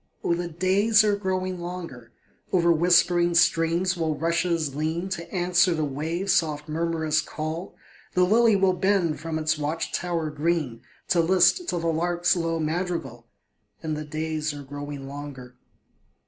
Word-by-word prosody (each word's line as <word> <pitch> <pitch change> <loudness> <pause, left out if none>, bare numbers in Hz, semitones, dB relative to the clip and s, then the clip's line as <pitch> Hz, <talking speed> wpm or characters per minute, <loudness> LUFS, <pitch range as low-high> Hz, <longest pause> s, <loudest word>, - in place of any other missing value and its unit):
Oh, - - +1
the 175 +1 -2
days 195 +6 +3
are 210 -1 +2
growing 185 -2 -2
longer; 170 -10 -7 0.4
Over 170 -2 +3
whispering 175 +1 +3
streams 170 +2 +2
will 160 -3 -1
rushes 165 -2 0
lean, 160 +5 -2
To 170 -3 -5
answer 180 -1 +2
the 155 -1 0
waves' 160 +7 -1
soft 150 -4 0
murmurous 160 0 0
call; 160 +4 -5 0.4
The 180 - +4
lily 220 +3 +4
will 190 -1 +3
bend 185 -4 +1
from 160 0 -4
its 155 0 0
watch 150 +3 -3
tower 170 -3 -2
green, 150 -6 -1 0.3
To 175 - +3
list 185 - +3
to - - -1
the 165 - -3
lark's 175 +2 +1
low 165 -1 -1
madrigal, 155 -7 -3 0.6
And 155 -1 -2
the 155 - -4
days 155 0 -3
are 145 - -8
growing 145 0 -7
longer. 135 -3 -9
165 Hz, 150 wpm, -25 LUFS, 155-180 Hz, 0.6 s, The